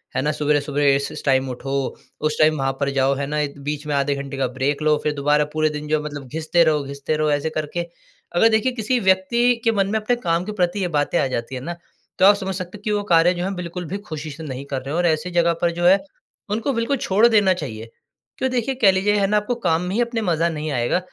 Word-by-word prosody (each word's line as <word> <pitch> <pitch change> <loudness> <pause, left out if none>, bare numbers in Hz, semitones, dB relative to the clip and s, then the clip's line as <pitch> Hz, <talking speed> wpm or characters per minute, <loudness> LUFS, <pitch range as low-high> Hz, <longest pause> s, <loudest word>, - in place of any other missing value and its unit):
है - - +1
ना? 150 - +1
सवेरे-सवेरे 145 -1 +1
इस 140 0 -2
इस - - -8
टाइम 130 -1 +2
उठो, 135 +1 -3 0.3
उस 155 0 0
टाइम 155 0 +4
वहाँ 135 -1 0
पर 140 -1 0
जाओ 135 0 +2
है 140 +1 -2
ना, 150 +1 -1
एक 145 -1 -3
बीच 150 +1 -4
में 150 - -1
आधे 140 0 +1
घंटे 140 0 -6
का 135 - +1
ब्रेक 135 +4 -2
लो, 150 -1 +3
फ़िर 150 - 0
दोबारा 150 +1 +2
पूरे 155 0 +2
दिन 150 0 -6
जो 155 0 +1
मतलब 145 -3 -7
घिसते 160 +5 +1
रहो 150 -3 +2
घिसते 140 +2 -3
रहो 155 0 +1
ऐसे 145 +2 0
करके। 155 +3 -3 0.5
अगर 225 +6 +5
देखिए 220 +4 +2
किसी 245 +1 -1
व्यक्ति 225 +6 +3
के 230 - +3
मन 195 -3 +1
में 220 - +1
अपने 230 +3 0
काम 175 -6 -1
के 215 - -4
प्रति 175 +3 +1
ये 180 - 0
बातें 145 +4 +1
आ - - +2
जाती 130 0 -4
है 125 - -5
ना, 170 +4 -5 0.4
तो 185 - +6
आप 205 +1 +8
समझ 190 -1 -4
सकते 185 +2 -6
हो - - -20
कि 210 - -1
वो 205 -1 0
कार्य 170 +2 +5
जो 175 - -4
है 195 +2 -2
बिल्कुल 180 0 -5
भी 190 +6 -4
ख़ुशी 155 -1 -6
से 160 +3 -9
नहीं 135 -2 -6
कर 135 -2 -4
रहे 135 +3 -6
और 175 - +1
ऐसी 160 +2 0
जगह 170 -1 +3
पर 170 -1 +2
जो 175 +1 -2
है 190 +2 +7 0.5
उनको 230 +6 -1
बिल्कुल 230 +4 0
छोड़ 210 +1 +3
देना 205 -5 +4
चाहिए। 115 -10 -7 0.5
क्यों 260 - 0
देखिए, 255 +1 -1
कह 220 -6 +5
लीजिए 190 +2 +1
है 195 - +2
ना 210 +1 +2
आपको 210 +4 -1
काम 170 -8 0
में 180 +3 -3
ही 240 - +2
अपने 235 -1 -1
मज़ा 170 -3 +1
नहीं 155 -1 -4
आएगा 120 +7 +1
160 Hz, 265 wpm, -21 LUFS, 145-195 Hz, 0.5 s, आप